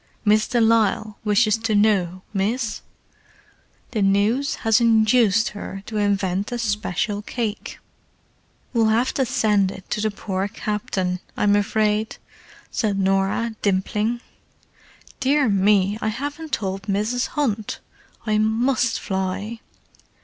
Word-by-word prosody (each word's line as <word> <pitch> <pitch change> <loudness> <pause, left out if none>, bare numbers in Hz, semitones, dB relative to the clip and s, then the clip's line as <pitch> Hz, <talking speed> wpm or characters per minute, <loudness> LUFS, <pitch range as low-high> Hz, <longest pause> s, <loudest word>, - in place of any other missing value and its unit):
"Miss 215 +1 +4
de 240 - +1
Lisle 220 -2 +2
wishes 215 0 +3
to 225 -1 0
know, 190 -4 +2
miss. 215 +2 -1 1.1
The 220 - -1
news 205 +8 +2
'as 225 +1 +4
induced 225 -1 +3
'er 195 -1 -7
to 220 - -5
invent 200 -1 0
a 245 - -2
special 210 -2 -1
cake." 220 -1 -4 1.0
"We'll 225 -2 +3
have 230 +4 +2
to 265 -2 0
send 210 -5 +2
it 190 0 -10
to 210 - -1
the 215 - +1
poor 195 -2 -3
Captain, 190 -3 -2 0.2
I'm 205 0 +3
afraid," 215 +1 0 0.5
said 205 -3 0
Norah, 195 +4 +1
dimpling. 210 +4 0 1.0
"Dear 275 +1 +2
me, 200 0 +3
I - - -1
haven't 290 +7 -4
told 195 -2 -3
Mrs. 215 +5 0
Hunt! 220 -8 -1 0.5
I 215 -1 +1
must 235 +3 +1
fly!" 190 +3 -3
215 Hz, 120 wpm, -22 LUFS, 200-230 Hz, 1.1 s, Miss